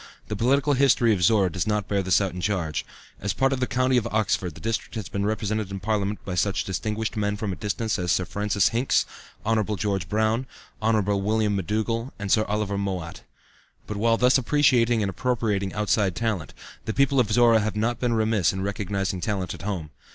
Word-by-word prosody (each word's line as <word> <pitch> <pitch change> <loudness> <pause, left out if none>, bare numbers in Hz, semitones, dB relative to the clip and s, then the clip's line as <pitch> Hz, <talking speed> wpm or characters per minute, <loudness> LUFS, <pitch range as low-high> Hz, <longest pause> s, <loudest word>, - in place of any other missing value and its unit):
The 105 - -2
political 140 +6 +2
history 125 -4 +4
of 95 - -2
Zorra 95 0 +4
does 85 +3 -2
not 105 -1 0
bear 100 - 0
out 95 - -2
this 95 - +4 0.2
charge. 90 -5 -1 0.4
As 100 - -2
a - - -22
part 135 0 +2
of 135 - -2
the 125 - 0
County 130 +1 +2
of 120 -1 +1
Oxford, 100 -7 0
the - - -11
district 115 +1 -3
has 110 -4 -4
been 100 0 -1
represented 110 -1 -1
in 95 0 -5
Parliament 105 0 -2
by 95 - -4
such 95 +2 0
distinguished 110 +4 -3
men 105 -1 -1
from 105 -2 -3
a - - -3
distance 105 +3 -2
as 90 -1 0
Sir 90 - +1
Francis 105 +1 +1
Hincks, 120 +3 +1 0.4
Hon. 110 0 +2
George 95 -3 -2
Brown, 110 +4 +1 0.3
Hon. 110 -1 +2 0.2
William 105 0 +1
McDougall 110 +5 -1
and 100 -2 -4
Sir 110 -1 +4
Oliver 105 -1 -1
Mowat. 95 -3 -4 0.6
But 105 - -5
while 115 +2 +2
thus 125 +3 +4
appreciating 120 -4 +3
and 100 - 0
appropriating 105 -3 -1
outside 105 -3 +1
talent, 110 -8 -2 0.3
the 110 - -3
people 140 0 +3
of 110 -4 +2
Zorra 115 0 +5
have 105 0 -2
not 115 +2 0
been 120 -2 0
remiss 110 -6 +2
in 95 0 -4
recognizing 100 -2 -2
talent 95 -2 -2
at - - -10
home. 90 -6 -4
105 Hz, 205 wpm, -25 LUFS, 100-115 Hz, 0.6 s, Zorra